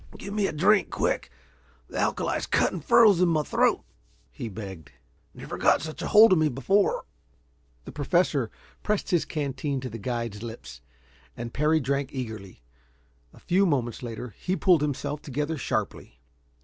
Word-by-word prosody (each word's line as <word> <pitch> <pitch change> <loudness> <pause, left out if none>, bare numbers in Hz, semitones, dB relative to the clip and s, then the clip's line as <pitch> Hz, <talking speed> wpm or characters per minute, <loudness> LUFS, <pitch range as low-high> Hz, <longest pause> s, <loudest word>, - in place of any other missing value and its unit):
"Give 200 - -7
me 205 -2 +1
a - - -3
drink, 195 +7 +3
quick. - - -1 0.6
The - - -5
alkali's - - -1
cutting 180 - +1
furrows 205 +2 +5
in 180 - +4
my 155 -2 +1
throat," - - +1 0.5
he 110 - -6
begged. 95 -8 -9 0.4
"Never - - -7
got - - +3
such 155 0 -6
a - - -3
hold 220 0 +7
of 175 - +3
me 155 -1 +3
before." 195 +10 +1 0.8
The - - -8
Professor 145 -4 +1 0.3
pressed 210 -1 -1
his 175 -3 +2
canteen 140 -1 -3
to 130 -2 -6
the 115 - -7
guide's 115 -2 -4
lips, 110 - -9 0.6
and 120 -1 -6
Parry 155 +2 +2
drank 140 0 -1
eagerly. 110 - -7 0.7
A - - -17
few 190 +2 +2
moments 125 -7 -1
later 120 -1 -6
he 185 - -1
pulled 180 -5 +4
himself 150 0 -2
together 150 +3 -3
sharply. - - -4
140 Hz, 160 wpm, -26 LUFS, 115-170 Hz, 0.8 s, hold